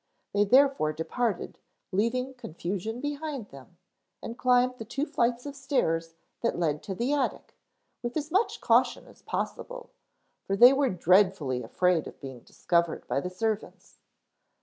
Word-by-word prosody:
They 205 0 +3
therefore 260 - +4
departed, 195 +6 -2 0.3
leaving 250 +7 0
confusion 205 +1 -5
behind 290 -5 -4
them, 140 +5 -14 0.5
and 230 - -5
climbed 250 0 +2
the - - -4
two 275 +6 -2
flights 245 -4 0
of 285 -1 -6
stairs 165 - -1 0.3
that 235 - 0
led 155 -4 0
to 190 - -5
the 245 +8 0
attic 280 -3 -2 0.5
with 240 +4 -3
as 305 +1 -4
much 390 +6 +1
caution - - +3
as - - -18
possible, - - -5 0.6
for 195 - +1
they 245 +6 +9
were 275 -1 +2
dreadfully 180 -7 +2
afraid 170 +7 +1
of - - -11
being 130 -3 -8
discovered 170 +6 -1
by 125 +3 0
the 180 - -4
servants. 215 +3 -4
225 Hz, 150 wpm, -28 LUFS, 170-265 Hz, 0.6 s, they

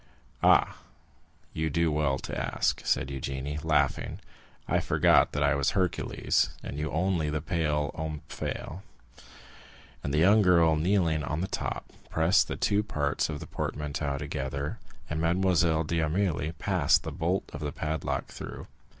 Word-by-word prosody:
"Ah, - - +4 0.8
you 80 0 -1
do 85 +1 +1
well 75 -3 +1
to - - -6
ask," - - -1
said 70 - +1
Eugénie, 70 +2 -4
laughing; 75 -3 +1 0.5
"I - - +2
forgot - - +4
that 75 - 0
I 70 +1 +4
was 70 -1 +1
Hercules, 90 -2 +1
and 70 - -5
you 75 - -2
only 85 -2 0
the 75 +1 -1
pale 75 -2 -1
Omphale!" 80 +3 -5 1.2
And 70 - -2
the 75 - 0
young 100 +7 +6
girl, 85 -4 +5
kneeling 80 -2 +1
on 75 +2 -2
the 95 - -1
top, - - -4 0.2
pressed 85 +3 +3
the - - -4
two 100 0 +2
parts 75 -10 -1
of 75 -2 -4
the - - -7
portmanteau 75 -1 -3
together, 70 -1 -4 0.3
and 75 +1 -2
Mademoiselle 85 -2 +2
d'Armilly 80 0 0
passed 90 -8 +2
the - - -4
bolt 90 +4 -1
of 75 - -5
the 75 -2 -3
padlock 75 +2 -2
through. - - -8
80 Hz, 150 wpm, -28 LUFS, 75-85 Hz, 1.2 s, young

